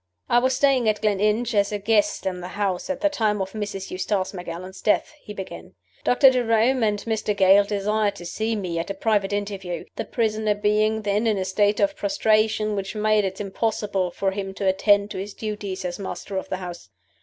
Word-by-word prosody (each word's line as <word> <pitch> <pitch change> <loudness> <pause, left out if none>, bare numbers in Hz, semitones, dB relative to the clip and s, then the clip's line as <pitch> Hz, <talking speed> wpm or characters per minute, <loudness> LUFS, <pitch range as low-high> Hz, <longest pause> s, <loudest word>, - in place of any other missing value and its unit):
"I 240 - +5
was 260 +1 +1
staying 265 -5 +3
at 210 - 0
Gleninch 215 +3 +1
as 200 -1 +2
a 210 - -1
guest 205 0 +1
in 180 -1 -2
the 175 - -6
house 195 +2 -2
at 280 0 -3
the 305 - +4
time 220 -8 0
of 190 0 -3
Mrs. 205 -2 -5
Eustace 190 +1 -1
Macallan's 180 +1 -7
death," 210 - +1
he - - -10
began. 195 -2 -8 0.3
"Doctor 265 +2 +6
Jerome 245 +1 +2
and 210 -2 +2
Mr. 215 -2 -1
Gale 195 +1 +6
desired 205 0 0
to 175 - -9
see 220 +6 -2
me 180 -5 -3
at 165 - -4
a 195 - -3
private 205 -1 +1
interview 200 -3 -3
the - - -3
prisoner 215 -2 0
being 215 +1 +1
then 210 +2 +1
in 215 -2 +2
a 190 - -1
state 205 +2 +2
of 300 0 +2
prostration 215 -6 +1
which 195 +1 -4
made 215 -1 +2
it 190 +1 -4
impossible 200 -2 -1
for 190 +2 -1
him 195 -1 -5
to 195 - -2
attend 200 +2 +3
to - - -4
his 200 +1 -6
duties 205 -3 -5
as 175 +1 -4
master 195 0 -6
of 190 - -3
the 185 - -2
house. 175 - -8
205 Hz, 205 wpm, -24 LUFS, 195-220 Hz, 0.3 s, Doctor